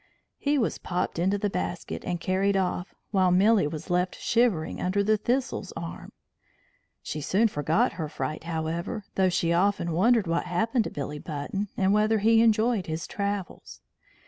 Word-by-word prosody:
He 290 Hz, +1 st, +1 dB
was 235 Hz, -, 0 dB
popped 175 Hz, -1 st, -2 dB
into 190 Hz, +4 st, +2 dB
the 205 Hz, +1 st, 0 dB
basket 180 Hz, -1 st, -4 dB
and 175 Hz, -1 st, -2 dB
carried 195 Hz, +3 st, +1 dB
off, 180 Hz, 0 st, -2 dB, 0.2 s
while 190 Hz, -3 st, +3 dB
Milly 195 Hz, 0 st, +4 dB
was 155 Hz, +4 st, -6 dB
left 180 Hz, +1 st, 0 dB
shivering 225 Hz, -10 st, +1 dB
under 195 Hz, +3 st, +1 dB
the 215 Hz, +2 st, +3 dB
thistle's 240 Hz, -2 st, -1 dB
arm. 165 Hz, 0 st, -7 dB, 0.9 s
She 150 Hz, -, -4 dB
soon 200 Hz, +10 st, +3 dB
forgot 155 Hz, -4 st, +1 dB
her 160 Hz, -3 st, -4 dB
fright, 155 Hz, +1 st, -4 dB
however, 170 Hz, +6 st, -3 dB
though 190 Hz, -1 st, +3 dB
she 170 Hz, -1 st, +1 dB
often 185 Hz, -1 st, +1 dB
wondered 220 Hz, +6 st, +3 dB
what 170 Hz, 0 st, 0 dB
happened 225 Hz, +6 st, 0 dB
to -, -, -3 dB
Billy 145 Hz, +1 st, -5 dB
Button, 160 Hz, +8 st, -4 dB
and 195 Hz, 0 st, +3 dB
whether 215 Hz, +1 st, +3 dB
he 225 Hz, +2 st, +4 dB
enjoyed 225 Hz, -2 st, +2 dB
his 160 Hz, +1 st, -3 dB
travels. 200 Hz, -2 st, -4 dB
190 Hz, 165 wpm, -27 LUFS, 170-215 Hz, 0.9 s, Milly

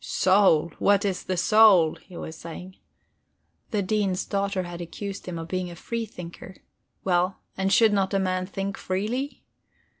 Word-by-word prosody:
"Soul 185 Hz, -4 st, +3 dB
what 200 Hz, 0 st, +3 dB
is 190 Hz, -2 st, -1 dB
the 185 Hz, -, -2 dB
soul?" 195 Hz, -5 st, +6 dB
he 180 Hz, -3 st, -14 dB
was 160 Hz, -, -7 dB
saying. 175 Hz, +3 st, -9 dB, 0.9 s
The 210 Hz, -2 st, 0 dB
Dean's 195 Hz, -2 st, 0 dB
daughter 200 Hz, -2 st, -1 dB
had 175 Hz, 0 st, -7 dB
accused 195 Hz, +4 st, -7 dB
him 175 Hz, -2 st, -4 dB
of 165 Hz, 0 st, -6 dB
being 185 Hz, 0 st, -2 dB
a 170 Hz, -, -9 dB
free 230 Hz, +6 st, -4 dB
thinker 180 Hz, -1 st, -10 dB, 0.5 s
well, 180 Hz, 0 st, +1 dB, 0.2 s
and 190 Hz, 0 st, 0 dB
should 220 Hz, 0 st, +5 dB
not 195 Hz, -2 st, +1 dB
a -, -, +3 dB
man 185 Hz, -1 st, -1 dB
think 195 Hz, 0 st, -4 dB
freely? 225 Hz, +9 st, -3 dB
190 Hz, 160 wpm, -25 LUFS, 180-200 Hz, 0.9 s, soul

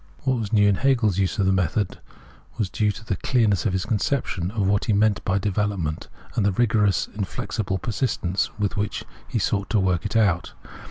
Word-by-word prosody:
'* 75 Hz, -, -27 dB
Wh.at 130 Hz, -, +3 dB
was 115 Hz, -5 st, -2 dB
new 105 Hz, -2 st, +5 dB
in 100 Hz, -, +4 dB
Hegel's 120 Hz, -8 st, +2 dB
use 95 Hz, -1 st, 0 dB
of 100 Hz, -, +2 dB
the 95 Hz, -, +3 dB
method 95 Hz, +2 st, 0 dB, 0.6 s
was 105 Hz, -5 st, -1 dB
due 105 Hz, -1 st, +1 dB
to 110 Hz, +3 st, -10 dB
the 95 Hz, -4 st, -2 dB
clearness 105 Hz, -8 st, +2 dB
of 95 Hz, -, -1 dB
his 95 Hz, +1 st, -1 dB
conception 105 Hz, -5 st, -1 dB
of 105 Hz, -1 st, -1 dB
what 100 Hz, +1 st, +2 dB
he 110 Hz, -, +2 dB
meant 105 Hz, 0 st, +2 dB
by 95 Hz, +1 st, +1 dB
develop 100 Hz, 0 st, 0 dB
ment, 80 Hz, -2 st, -3 dB, 0.3 s
and 110 Hz, -, +1 dB
the 100 Hz, -, +3 dB
rigorous, 105 Hz, -4 st, +2 dB
inflexible 100 Hz, 0 st, -3 dB
persistence 100 Hz, -4 st, -1 dB
with 105 Hz, -2 st, -1 dB
which 105 Hz, 0 st, -2 dB, 0.2 s
he -, -, -2 dB
sought 100 Hz, 0 st, 0 dB
to 110 Hz, -, +2 dB
work 90 Hz, -3 st, +1 dB
it -, -, -4 dB
out. 100 Hz, -6 st, +2 dB
100 Hz, 210 wpm, -24 LUFS, 95-110 Hz, 0.6 s, new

